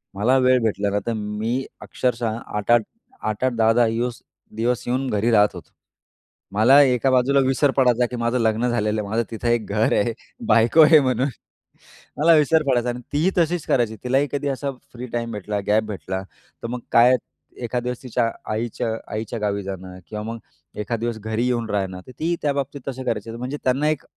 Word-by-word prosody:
मला 120 +7 +3
वेळ 130 0 +4
भेटला 100 -2 0
ना, 100 +1 0
तर 115 - 0
मी 110 +4 -2 0.2
अक्षरशः 120 -2 -1
8-8 115 +1 +1 0.4
8-8, 120 +4 -1
10-10 115 +1 +4 0.7
दिवस 120 +2 0
येऊन 130 +2 -1
घरी 110 +3 +1
राहत 105 -1 +5
होतो. - - -11 0.8
मला 130 +7 +6
एका 130 0 +2
बाजूला 130 +2 +3
विसर 135 +1 +2
पडायचा, 125 -2 +4
की 125 - -6
माझं 120 +2 0
लग्न 115 +1 +1
झालेलं 110 -2 0
आहे, 100 - -7
माझं 115 +2 +1
तिथं 115 +1 -4
एक 120 -2 +1
घर 105 +2 +2
आहे, 115 +2 0 0.3
बायको 115 +8 +5
आहे 155 0 +8
म्हणून, 130 0 +1 0.9
मला 165 +3 +6
विसर 155 +1 +3
पडायचा 125 -2 +2
आणि 120 0 -4
तीही 155 +6 +2
तशीच 170 -1 +1
करायची 115 -4 +1
तिलाही 135 +3 +2
कधी 145 0 -2
असा 140 +1 -2 0.2
फ्री 125 +1 -7
टाईम 115 -1 -2
भेटला, 105 0 -3
गॅप 110 +1 +3
भेटला. 95 -3 -5 0.4
तर - - -2
मग 125 +1 -3
काय, 125 +2 +7 0.4
एखादा 120 0 -3
दिवस 125 +1 -4
तिच्या 120 -2 0 0.2
आईच्या 115 +1 -2 0.2
आईच्या 115 +2 -4
गावी 100 -1 -1
जाणं 95 -1 -7
किंवा 105 -1 -5
मग 115 +1 -5 0.4
एखादा 115 +2 -3
दिवस 115 -1 -3
घरी 110 +3 -2
येऊन 120 -3 -1
राहणं, 95 -2 -2
तर - - -10
तीही 170 +2 0
त्याबाबतीत 140 -1 -2
तसं 130 0 -6
करायची, 115 0 -2
म्हणजे 125 +5 -5
त्यांना 135 +4 +2
एक 155 -3 -2
120 Hz, 180 wpm, -22 LUFS, 110-130 Hz, 0.9 s, आहे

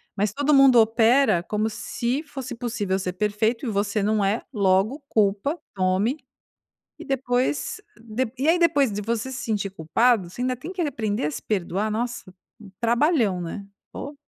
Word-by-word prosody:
mas 205 0 0
todo 290 +4 +1
mundo 270 -3 +7
opera 225 -2 +4
como 215 +3 -1
se 240 +5 -2
fosse 270 -4 -7
possível 215 -5 -2
ser 180 -1 -3
perfeito, 210 +6 0
e - - -1
você 205 0 0
não 210 0 +1
é, 200 +4 0
logo, 200 +6 +2
culpa, 210 - +1
tome, 190 +8 +1 0.8
e - - -9
depois 270 +8 -1 0.2
d 230 +3 -3
dê 225 - -10
e 285 +5 +1
aí 345 - +4
depois 290 -8 +3
de 205 - -3
você 230 +4 -2
se 260 - -5
sentir 205 -3 -1
culpado 190 +4 +2
você 245 - -8
ainda 255 0 0
tem 320 +9 -8
que 360 - -3
aprender 220 - -1
a 150 - -3
se 150 - -6
perdoar? 200 +1 -1
Nossa! 235 -4 -4 0.5
Trabalhão, 235 - +2
né? 185 +4 -6 0.3
pô. 285 0 -7
225 Hz, 170 wpm, -24 LUFS, 200-260 Hz, 0.8 s, mundo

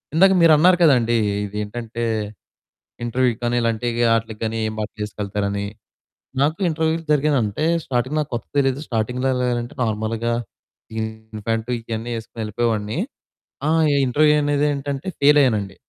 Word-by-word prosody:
ఇందాక 190 +3 +6
మీరు 165 -2 +7
అన్నారు 180 +4 +5
కదండీ 120 -6 +4 0.3
ఇది 105 +1 -7
ఏంటంటే, 115 +2 -5 1.0
ఇంటర్వ్యూ‍‍కి 120 -1 +1
గాని, 120 0 +1
ఇలాంటి 115 +1 0 0.3
ఆట్లకి 110 -1 -3
గాని 110 0 -2
ఏం 110 - -5
బట్టలేసుకెళ్తారని. 105 -1 -3 0.8
నాకు 155 +5 +1
ఇంటర్వ్యూ‍లు 160 +1 0
జరిగిన 150 0 +3
అంటే 105 +9 -2 0.2
స్టార్టింగ్ 130 +4 -1
నాకు 150 -1 -3
కొత్తగా 120 - -5
తెలియదు. 135 0 +1
స్టార్టింగ్‍లో 125 +3 -1
ఎలా 125 - -1
ఎళ్ళాలంటే, 120 0 -3
నార్మల్‍గా 110 +1 -1 0.6
జీను 110 -1 -6
ప్యాంటు 115 +1 -1
ఇయన్నీ 115 +1 -5
యేసుకొని 115 0 -8
ఎళ్ళిపోయేవాడిని. 110 +3 -1 0.7
ఆ! - - +2 0.2
ఈ - - +2
ఇంటర్వ్యూ 150 +4 +4
అనేదేంటంటే 145 0 -1
ఫెయిల్ 145 +1 +6
అయ్యానండి. 105 -7 +1
120 Hz, 135 wpm, -21 LUFS, 110-140 Hz, 1.0 s, మీరు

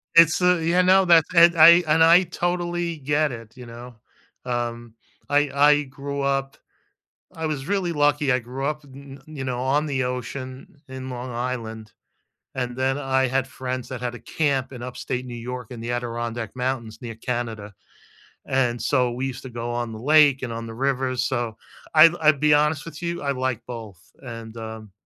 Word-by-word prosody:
It's 165 +1 +6
a 180 -2 +3
you 175 +2 +3
know 190 +1 +5
that 165 -3 +6
that 170 0 +7
I 170 +2 +8
and 160 +1 +4
I 170 +3 +7
totally 175 -1 -2
get 145 +1 0
it, 115 -1 -10
you 125 - -10
know, 120 +1 -11 0.5
um, 120 -1 -4 0.4
I 145 0 +3
I 145 +1 +5
grew 140 +1 -6
up 135 0 -1 0.8
I 160 -1 -4
was 145 -3 -3
really 195 -4 0
lucky, 145 -1 +2
I 125 - +3
grew 130 +4 -5
up, 150 0 -3
n 135 0 -12
n 155 -1 -11
you 135 - -4
know, 125 -1 -3
on 145 +4 +1
the 135 -3 -1
ocean 130 +3 -6
in 130 0 -7
Long 125 0 -6
Island, 115 -3 -5 0.6
and 125 -1 -3
then 135 +1 0
I 130 -2 +1
had 130 +1 0
friends 130 -1 -5
that 130 -2 -5
had 120 -1 -3
a - - -9
camp 135 -4 -1
in 125 -2 -9
Upstate 125 0 -4
New 120 -1 -7
York 125 0 -6
in 115 -2 -8
the 120 +1 -4
Adirondack 120 -1 -4
Mountains 125 -3 -3
near 115 -2 -7
Canada, 115 -4 -4 0.7
and 125 -3 0
so 125 0 +1
we 125 +3 -3
used 125 -2 -6
to 130 - -9
go 120 0 -5
on 120 -1 -3
the 110 - -7
lake 145 +1 +4
and 120 -3 -4
on 115 0 -5
the 115 - -8
river, 130 0 -1
so 120 -3 -2 0.4
I 155 +1 +9
I'll 155 0 +6
be 150 0 +4
honest 150 0 +2
with 165 0 -10
you, 170 0 -3
I 140 -1 -1
like 130 -3 -2
both, 110 -7 -8 0.2
and, 115 -2 -9
um 110 -2 -8
130 Hz, 190 wpm, -23 LUFS, 120-150 Hz, 0.8 s, I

